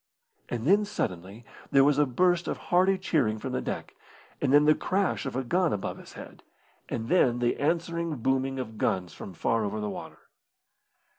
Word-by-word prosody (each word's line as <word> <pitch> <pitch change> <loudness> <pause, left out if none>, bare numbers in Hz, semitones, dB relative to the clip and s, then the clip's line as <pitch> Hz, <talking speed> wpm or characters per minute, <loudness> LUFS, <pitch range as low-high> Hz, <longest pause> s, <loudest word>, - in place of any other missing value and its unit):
And 120 -1 -3
then 200 +6 +5
suddenly 95 - -4 0.2
there 135 -1 +5
was 145 0 +3
a 150 - +4
burst 175 +7 +2
of - - -2
hearty 185 +2 +2
cheering 140 - 0
from - - -5
the - - -1
deck, - - -5 0.5
and 140 - +1
then 145 +1 +6
the 155 - +6
crash 185 -3 -1
of 130 - -5
a 130 - -1
gun 175 +6 +1
above 100 - -3
his - - -13
head, - - -11 0.5
and 115 0 -3
then 125 -8 +3
the 120 0 0
answering 170 +1 -1
booming 135 +2 0
of 110 -4 -6
guns 90 -2 -1
from 95 - -9
far 115 +6 0
over 105 +1 -3
the 105 -1 -3
water. - - -8
135 Hz, 190 wpm, -28 LUFS, 115-170 Hz, 0.5 s, then